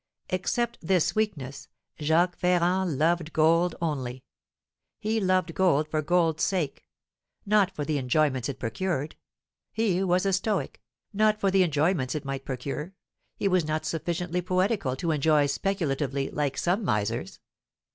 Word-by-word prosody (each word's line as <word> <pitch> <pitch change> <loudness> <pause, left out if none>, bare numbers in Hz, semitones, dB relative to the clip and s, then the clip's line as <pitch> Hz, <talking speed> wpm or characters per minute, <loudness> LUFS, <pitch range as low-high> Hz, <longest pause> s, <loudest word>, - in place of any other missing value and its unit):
Except 235 +6 -1
this 175 -1 +2
weakness, 170 -12 -3 0.3
Jacques 165 +4 +2
Ferrand 180 -2 +1
loved 165 +1 +1
gold 165 +2 +3
only. 130 -6 -3 0.7
He 220 +1 -1
loved 185 -3 +1
gold 160 -5 +2
for 155 0 -1
gold's 165 0 +1
sake; 175 -8 -1 0.6
not 205 -2 +4
for 150 - -3
the 150 -1 0
enjoyments 130 -1 +1
it 135 - -4
procured, 145 +5 -2 0.6
he 200 -4 +1
was 180 0 +2
a 195 - +2
stoic; 195 +1 -1 0.3
not 215 +1 +3
for 195 -2 +2
the 190 0 +4
enjoyments 155 -4 +1
it 150 - -4
might 135 0 -4
procure, 140 +7 -5 0.4
he - - -1
was 185 -3 +3
not 155 0 -2
sufficiently 175 +2 -2
poetical 185 - 0
to 165 +5 -1
enjoy 150 0 +3
speculatively, 140 - -1
like 145 -2 -1
some 185 +6 0
misers. 105 - -1
165 Hz, 140 wpm, -27 LUFS, 145-185 Hz, 0.7 s, not